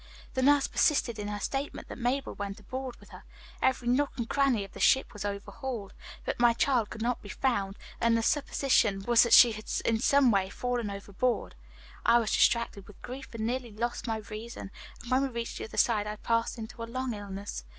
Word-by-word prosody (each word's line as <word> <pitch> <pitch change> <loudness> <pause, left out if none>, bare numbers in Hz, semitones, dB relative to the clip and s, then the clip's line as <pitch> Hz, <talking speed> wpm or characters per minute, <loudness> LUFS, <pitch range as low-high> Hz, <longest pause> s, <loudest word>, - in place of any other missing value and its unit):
The 260 - 0
nurse 285 +1 +5
persisted 240 -7 +1
in 205 - -4
her 205 0 -3
statement 275 +7 -3
that - - -8
Mabel 255 +3 -1
went 200 0 -5
aboard 255 +4 -6
with - - -17
her. - - -12 0.4
Every 260 -2 +1
nook 275 +4 +2
and 235 -2 -2
cranny 275 -6 +2
of 195 - -10
the - - -11
ship 265 - +3
was 210 -2 -6
overhauled, 205 +2 -5 0.3
but - - -2
my 240 -1 +5
child 235 -3 +1
could 220 0 -6
not 245 0 -1
be 205 - -11
found, 200 -4 -1 0.2
and 230 0 +3
the 225 - 0
supposition 235 -8 +2
was 235 +1 +5
that 235 - +2
she 240 - +9
had 215 0 -8 0.2
in 225 -1 +2
some 275 +1 +4
way 195 -2 +1
fallen 245 0 -2
overboard. 200 +5 -2 0.5
"I 235 - +6
was 230 -3 0
distracted 235 -4 +2
with 205 - -15
grief, 265 +2 -8
and 220 -1 -2
nearly 245 0 -2
lost 235 +3 -3
my 225 -1 0
reason, 215 -2 -7 0.3
and 240 - -9
when 255 +1 +4
we 275 - +1
reached 235 -2 -5
the - - -4
other - - -10
side 210 -3 +3
I 210 - -3
passed 230 +2 -1
into 225 +1 -8
a - - -2
long 255 +1 -3
illness. 200 - -6
235 Hz, 215 wpm, -29 LUFS, 210-255 Hz, 0.5 s, she